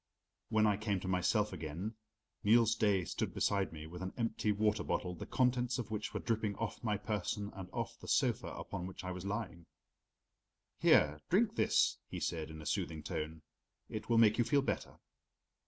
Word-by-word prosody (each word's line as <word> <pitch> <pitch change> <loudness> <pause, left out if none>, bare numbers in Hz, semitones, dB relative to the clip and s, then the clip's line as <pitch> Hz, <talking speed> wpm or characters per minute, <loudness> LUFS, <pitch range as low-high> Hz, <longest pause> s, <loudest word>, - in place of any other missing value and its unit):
When 110 -1 +4
I 105 -2 +3
came 105 -2 0
to 95 - -5
myself 95 +3 +2
again, 85 +5 -4 0.5
Niels 115 +1 +5
Daae 100 -5 +2
stood - - -3
beside 100 -1 +1
me 80 -1 -8
with 90 +3 -8
an 95 0 -4
empty 115 -2 0
water 105 +1 +1
bottle, 90 - -1
the 85 - -7
contents 125 -1 +2
of 120 -4 -4
which 105 -1 -3
were - - -3
dripping 110 -3 -1
off 115 +3 -4
my 105 -3 +1
person 105 0 -2
and 95 -2 -7
off - - -4
the - - -11
sofa - - +2
upon 90 0 -5
which 95 0 -8
I 90 - -3
was 90 +1 -6
lying. 100 -5 -4 1.1
"Here, 75 +1 +5
drink 215 +4 +3
this," - - +3
he - - -4
said 80 -2 -2
in 80 -1 -8
a - - -12
soothing 80 +1 -2
tone. 80 +1 -4 0.5
"It 110 +1 -5
will 115 - +4
make 110 0 +6
you - - +6
feel 140 +3 +3
better." - - -3
105 Hz, 190 wpm, -35 LUFS, 90-110 Hz, 1.1 s, make